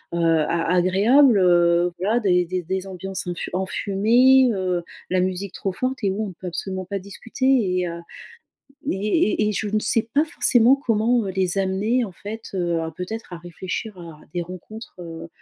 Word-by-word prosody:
heu, - - -1
a 165 0 +2
agréables, 205 +8 +4
heu. 175 -1 +4
Voilà 215 +6 +1
des 180 -4 +2
des 180 +1 -3
des 190 +3 -3
ambiances, 190 0 -6
infu 175 -1 -4
enfumées, 225 +8 +3
heu, 185 -4 -1 0.3
la 185 - +2
musique 185 +1 -2
trop 195 - -3
forte 255 +3 -3
et 195 - +2
où 210 +3 -2
on 190 - -7
peut 180 +2 -9
absolument 185 +2 -4
pas 200 +2 -3
discuter. 200 +7 -6
Et, 185 -9 +2
heu, 170 0 -6 0.9
et 190 - -2 0.5
et - - +1
et - - -2
je 210 +1 -2
ne 215 +1 +1
sais 215 +1 +1
pas 295 +2 +3
forcément 250 -4 +4
comment, 230 -3 +1
heu, - - -2
les 185 0 -1
amener, 200 +6 +1
en 195 - -8
fait, 215 +5 -8
heu, 175 -3 0
à 160 0 -4
peut-être 180 +5 -7
à - - -5
réfléchir 185 +4 -6
à 165 -3 -11
des 175 - -1
rencontres, 185 +6 -10
heu, 165 -1 -8
190 Hz, 185 wpm, -22 LUFS, 180-220 Hz, 0.9 s, agréables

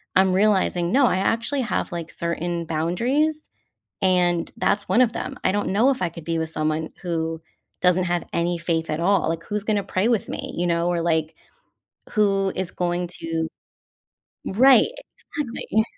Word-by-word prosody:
I'm 190 0 +4
realizing, 185 -3 +2
no, 275 +3 +4
I - - +1
actually 230 +7 0
have, 235 -4 -2
like, 170 -1 -5
certain 170 0 -2
boundaries, 245 - 0 0.5
and, 180 -2 +2
that's 200 0 +1
one 245 - +4
of 235 -3 +3
them. 270 - -5
I - - +3
don't 205 +1 -1
know 220 +8 +3
if 260 - -3
I 175 - +1
could 170 -1 -10
be 165 0 -2
with 160 0 -1
someone 155 0 -1
who 165 -2 -2 0.4
doesn't 180 0 +4
have 175 -1 -1
any 170 +1 0
faith 165 -1 -1
at 155 - -2
all, 180 -1 +2
like, 165 0 -3
who's 210 0 -3
gonna 210 -2 0
pray 190 +4 0
with 235 -4 0
me, - - -5
you 175 - 0
know, 170 0 +1
or, 175 -1 0
like, 160 -2 0 0.8
who 195 -3 +2
is 185 -1 +1
going 175 0 -2
to 165 -2 -2 1.0
Right. 255 - +6 0.5
Exactly. 230 -5 0
180 Hz, 175 wpm, -23 LUFS, 170-210 Hz, 1.0 s, Right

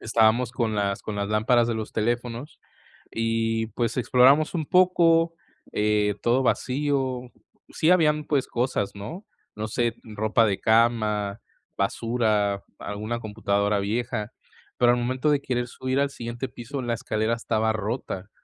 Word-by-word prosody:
Estábamos, 115 +2 +2
con 115 -4 -1
las 100 -1 -1
con 105 - -5
las 100 0 -2
lámparas 115 +3 +3
de 115 - 0
los 110 -1 -4
teléfonos, 120 +4 -3 0.5
y 115 0 0
pues, 115 +2 -2
exploramos 135 +6 +4
un 160 -3 -2
poco, 170 -2 +4 0.4
eh, 105 -1 +1
todo 125 +3 +2
vacío. 130 -1 0 0.5
Sí 160 - +1
habían, 155 -4 +4
pues, 140 -3 0
cosas, 120 -5 -1
¿no?, 160 - -8 0.3
no 110 +1 -4
sé, 120 +1 -1
ropa 110 +1 +1
de 100 -2 0
cama, 110 -2 +2 0.3
basura, 105 -1 0
alguna 105 +3 -4
computadora 105 -2 0
vieja, 105 +1 -2 0.5
pero 120 -1 +5
al 120 - +2
momento 130 +5 0
de 140 -1 +2
querer 125 -2 -2
subir 130 +2 -2
al 140 0 +1
siguiente 120 +1 -5
piso, 125 +2 -6
la 120 -1 -1
escalera 115 -1 -1
estaba 110 -1 0
rota. 105 -2 -4
115 Hz, 145 wpm, -25 LUFS, 105-130 Hz, 0.5 s, pero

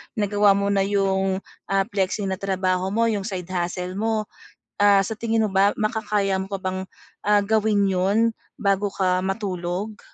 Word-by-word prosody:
nagawa 205 -1 +3
mo 200 0 0
na 195 -1 +2
yung, 195 -1 0 0.2
ah, 195 0 +2
flexi 200 +1 -1
na 190 -1 -2
trabaho 185 -1 0
mo, 230 0 +3
yung 200 -2 -2
side 185 -3 -5
hustle 180 +1 -3
mo. 220 0 0 0.6
Ah, 200 -1 +5
sa 215 +2 -5
tingin 225 -1 +1
mo 215 - -1
ba, 195 +1 +3
makakaya 210 -3 0
mo 190 - -4
pa 195 -1 -5
bang, 185 0 -2 0.5
ah, 205 -1 +4
gawin 205 -1 +2
'yon 200 +5 +2 0.2
bago 200 -1 +1
ka 185 -2 0
matulog? 190 +1 -3
195 Hz, 165 wpm, -23 LUFS, 190-210 Hz, 0.6 s, Ah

